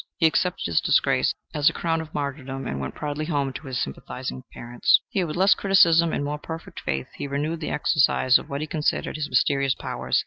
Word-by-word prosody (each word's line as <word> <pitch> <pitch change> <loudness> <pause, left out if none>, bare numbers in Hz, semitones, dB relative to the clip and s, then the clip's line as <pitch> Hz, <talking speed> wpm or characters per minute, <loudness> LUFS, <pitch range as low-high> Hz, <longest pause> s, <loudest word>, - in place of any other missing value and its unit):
He 165 - +2
accepted 180 +3 +1
his 85 -2 +1
disgrace - - +2 0.2
as 150 0 +4
a - - -7
crown 165 -1 -1
of 160 -1 -10
martyrdom, 135 -2 -4
and 70 - -3
went 70 -1 -5
proudly 150 +1 -3
home 140 -4 -1
to 135 +2 -8
his 130 -2 -3
sympathizing 65 -1 -5
parents. 120 0 +2
Here, 185 -3 -1
with 150 - -5
less 190 +3 +5
criticism 170 -4 +4
and - - -2
more 150 +1 -3
perfect 165 +2 -8
faith, 65 0 -3
he - - -5
renewed 150 +4 -2
the 155 - -4
exercise 130 -3 +3
of - - -12
what 140 +1 -3
he - - -2
considered 155 -1 -1
his 155 -1 -3
mysterious 135 +1 +2
powers. - - -1
145 Hz, 210 wpm, -24 LUFS, 135-160 Hz, 0.2 s, less